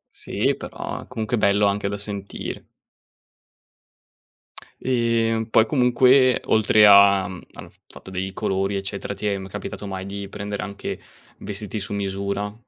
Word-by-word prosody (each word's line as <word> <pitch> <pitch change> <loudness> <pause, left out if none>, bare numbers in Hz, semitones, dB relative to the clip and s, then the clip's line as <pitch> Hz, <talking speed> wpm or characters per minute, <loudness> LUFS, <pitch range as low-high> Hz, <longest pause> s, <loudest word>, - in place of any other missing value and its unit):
Sì, - - -1
però - - -7
comunque 120 0 -2
è - - -1
bello 100 0 +3
anche 100 0 0
da 100 - -3
sentire. 100 -1 -6 2.1
Ehm, 115 -2 +1
poi 110 - +5
comunque 130 0 +4
oltre 110 -1 +5
a 100 -1 +7
mhmm, 95 -3 -8
al - - -11
f - - -33
fatto - - -13
dei 95 +1 -4
colori 95 +1 -1
eccetera, 100 +1 -4
ti 100 +2 -4
è 100 -1 0
m 95 0 -7
capitato 105 +1 -7
mai 95 -1 -5
di 100 0 -6
prendere 100 +1 -5
anche 100 -1 -6 0.4
vestiti 105 +1 -6
su 105 +1 -6
misura? 100 +1 -3
100 Hz, 145 wpm, -23 LUFS, 100-110 Hz, 2.1 s, a